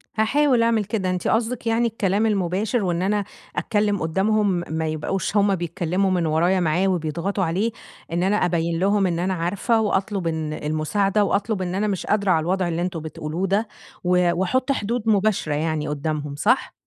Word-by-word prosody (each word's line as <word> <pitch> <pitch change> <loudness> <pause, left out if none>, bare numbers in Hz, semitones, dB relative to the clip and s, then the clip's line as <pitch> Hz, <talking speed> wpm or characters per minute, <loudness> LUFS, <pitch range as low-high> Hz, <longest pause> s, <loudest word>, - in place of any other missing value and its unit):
هاحاول 250 +3 +3
اعمل 225 -3 +2
كده، 200 -3 -2
أنتِ 180 -1 -2
قصدِك 230 +1 0
يعني 230 +1 +2
الكلام 210 -1 0
المباشر 205 +2 0
وإن 175 -2 0
أنا 205 +2 +1 0.3
أتكلّم 205 -2 0
قدامهم 190 +2 +1
ما 160 0 -1
يبقوش 185 +7 -2
هُم 200 -1 +3
بيتكلموا 175 +2 -1
من 175 -2 +1
ورايا 170 +4 +2
معاه 175 +3 +1
وبيضغطوا 175 +3 -1
عليه، 185 +7 0 0.4
إن 175 +2 0
أنا 200 +2 +2
أبيّن 170 -3 0
لهم 200 +1 +2
إن 170 -1 -1
أنا 185 +2 0
عارفة 190 +7 0
وأطلب 195 -3 -1
إن 160 -2 -2
المساعدة، 190 +8 0
وأطلب 200 0 0
إن 180 0 -2
أنا 210 +2 0
مش 195 -3 -2
قادرة 200 -2 +1
على 160 - +4
الوضع 185 +2 0
اللي 170 0 -2
أنتم 175 -2 -2
بتقولوه 160 +4 -4
ده، 205 +4 +1 0.4
و 180 -1 +3
واحُط 250 +10 0
حدود 230 -2 -1
مباشرة 200 -6 +2
يعني 155 0 -1
قدامهم، 150 0 -3
صح؟ 230 - +1
190 Hz, 175 wpm, -23 LUFS, 170-210 Hz, 0.4 s, على